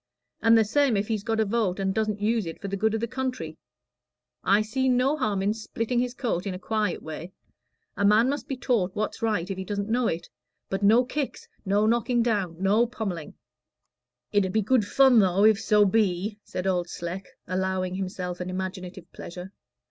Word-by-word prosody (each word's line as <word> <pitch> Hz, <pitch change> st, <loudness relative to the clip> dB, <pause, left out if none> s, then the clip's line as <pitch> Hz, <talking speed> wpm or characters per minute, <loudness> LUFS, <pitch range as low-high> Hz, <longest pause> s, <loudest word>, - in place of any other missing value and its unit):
And 230 Hz, 0 st, +6 dB
the 220 Hz, -, +4 dB
same 260 Hz, 0 st, +2 dB
if 205 Hz, +2 st, -2 dB
he's 215 Hz, -2 st, 0 dB
got 225 Hz, +1 st, -1 dB
a 220 Hz, -, +3 dB
vote 205 Hz, -3 st, 0 dB
and 190 Hz, 0 st, 0 dB
doesn't 215 Hz, -1 st, -1 dB
use 220 Hz, -3 st, +1 dB
it 165 Hz, -, -7 dB
for 200 Hz, -, -5 dB
the 200 Hz, -, -2 dB
good 220 Hz, +2 st, +1 dB
of 220 Hz, -, -2 dB
the 235 Hz, -, -1 dB
country; 255 Hz, -11 st, -4 dB, 0.8 s
I 215 Hz, -, +4 dB
see 260 Hz, +5 st, 0 dB
no 255 Hz, +4 st, +3 dB
harm 210 Hz, -9 st, -1 dB
in 205 Hz, +2 st, +2 dB
splitting 230 Hz, +2 st, -2 dB
his 250 Hz, 0 st, -1 dB
coat 210 Hz, -8 st, -2 dB
in 190 Hz, -, -3 dB
a -, -, -4 dB
quiet 215 Hz, +3 st, -2 dB
way. 160 Hz, +3 st, -7 dB, 0.6 s
A -, -, -1 dB
man 210 Hz, +4 st, +5 dB
must 285 Hz, +2 st, -2 dB
be 270 Hz, -, -3 dB
taught 215 Hz, -8 st, 0 dB
what's 215 Hz, +1 st, -3 dB
right 210 Hz, -6 st, 0 dB
if 195 Hz, -1 st, -4 dB
he -, -, -3 dB
doesn't 200 Hz, +1 st, -3 dB
know 240 Hz, 0 st, +2 dB
it. 165 Hz, -, -3 dB, 0.4 s
But 195 Hz, +1 st, -2 dB
no 225 Hz, +5 st, +5 dB
kicks, 285 Hz, +1 st, -4 dB, 0.2 s
no 200 Hz, +2 st, +2 dB
knocking 235 Hz, +1 st, +2 dB
down, 200 Hz, -8 st, 0 dB
no 205 Hz, +5 st, +3 dB
pommelling." 195 Hz, -9 st, -5 dB, 1.0 s
"It 205 Hz, -1 st, +3 dB
'ud 190 Hz, -, -2 dB
be 220 Hz, -1 st, +2 dB
good 220 Hz, -1 st, +2 dB
fun, 265 Hz, 0 st, +5 dB
though, 195 Hz, 0 st, +3 dB
if 220 Hz, -1 st, +5 dB
so 210 Hz, -1 st, +4 dB
be," 205 Hz, 0 st, +1 dB
said 185 Hz, -, -5 dB
Old 180 Hz, -2 st, 0 dB
Sleck, 175 Hz, +3 st, -6 dB, 0.2 s
allowing 185 Hz, 0 st, -1 dB
himself 185 Hz, -2 st, -4 dB
an 180 Hz, 0 st, -4 dB
imaginative 185 Hz, -1 st, -5 dB
pleasure. 180 Hz, +3 st, -9 dB
210 Hz, 200 wpm, -26 LUFS, 185-230 Hz, 1.0 s, And